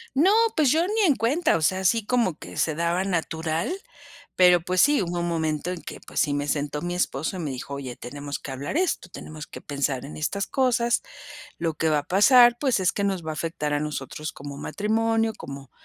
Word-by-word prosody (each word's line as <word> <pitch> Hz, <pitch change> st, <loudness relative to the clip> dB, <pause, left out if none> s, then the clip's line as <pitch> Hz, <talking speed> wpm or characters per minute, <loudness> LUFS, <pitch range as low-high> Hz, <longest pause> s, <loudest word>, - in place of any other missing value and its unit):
No 335 Hz, +8 st, +5 dB, 0.3 s
pues, 295 Hz, -5 st, +4 dB
yo 330 Hz, +3 st, +3 dB
ni 430 Hz, +2 st, +1 dB
en 285 Hz, -, +4 dB
cuenta, 265 Hz, -, +2 dB
o -, -, -2 dB
sea, 185 Hz, +4 st, +2 dB
así 210 Hz, +4 st, +2 dB
como 235 Hz, -9 st, +1 dB
que -, -, -10 dB
se 155 Hz, -, +1 dB
daba 170 Hz, +3 st, 0 dB
natural, 165 Hz, -, -1 dB, 0.7 s
pero 180 Hz, -2 st, +6 dB
pues 180 Hz, +1 st, +1 dB
sí, 290 Hz, -3 st, +4 dB
hubo 175 Hz, -1 st, -2 dB
un 175 Hz, -, -1 dB
momento 160 Hz, 0 st, -1 dB
en 180 Hz, -, -5 dB
que -, -, -8 dB
pues, -, -, -4 dB
sí 145 Hz, -, +2 dB
me 145 Hz, 0 st, -2 dB
sentó 145 Hz, 0 st, -2 dB
mi 175 Hz, 0 st, -3 dB
esposo 170 Hz, +1 st, -1 dB
y -, -, -5 dB
me 150 Hz, -4 st, -3 dB
dijo: 130 Hz, +2 st, -6 dB
"Oye 130 Hz, -3 st, -6 dB
tenemos 145 Hz, +2 st, -6 dB
que 135 Hz, -, -7 dB
hablar 135 Hz, -, -5 dB
esto, 350 Hz, -, 0 dB
tenemos 155 Hz, -3 st, -9 dB
que -, -, -10 dB
pensar 140 Hz, -2 st, -2 dB
en 145 Hz, -, -9 dB
estas 200 Hz, +6 st, -1 dB
cosas, 240 Hz, -3 st, +1 dB, 0.6 s
lo 165 Hz, -2 st, -1 dB
que 160 Hz, +1 st, 0 dB
va 150 Hz, -, +3 dB
a -, -, -1 dB
pasar 240 Hz, -, +6 dB
pues, 260 Hz, -8 st, +1 dB
es 185 Hz, -, +2 dB
que 200 Hz, -, -2 dB
nos 190 Hz, -4 st, -1 dB
va 160 Hz, -, -3 dB
a -, -, -3 dB
afectar 155 Hz, -1 st, -3 dB
a 145 Hz, -, 0 dB
nosotros 150 Hz, 0 st, -4 dB
como 140 Hz, 0 st, -8 dB
matrimonio, 225 Hz, +6 st, 0 dB
como 140 Hz, -1 st, -9 dB
170 Hz, 225 wpm, -25 LUFS, 150-225 Hz, 0.7 s, pero